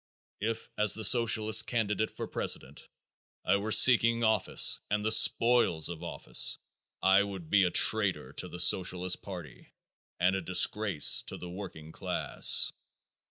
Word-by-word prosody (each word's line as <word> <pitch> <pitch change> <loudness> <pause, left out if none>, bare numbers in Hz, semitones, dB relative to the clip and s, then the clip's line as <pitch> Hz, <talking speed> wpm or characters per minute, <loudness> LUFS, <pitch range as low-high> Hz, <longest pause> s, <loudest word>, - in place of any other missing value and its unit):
If, 115 +2 -6
as 105 -1 +3
the 110 - -7
Socialist 110 -1 +3
candidate 110 -2 -3
for - - -9
president, - - -5 0.6
I 100 - +1
were 105 +2 -6
seeking 115 +1 +4
office 110 -3 +1
and 105 +1 -3
the 110 - -1
spoils 115 -6 +3
of 85 -2 -9
office - - -1 0.5
I 95 +1 +3
would 95 -5 -8
be 100 -2 +3
a - - -1
traitor 105 +1 0
to - - -4
the 90 - -11
Socialist 90 0 0
party 90 -9 -12 0.4
and 90 +2 0
a 95 - -4
disgrace 90 -1 +1
to - - -7
the 90 - -11
working 85 -5 -11
class. - - +2
100 Hz, 145 wpm, -28 LUFS, 90-110 Hz, 0.6 s, seeking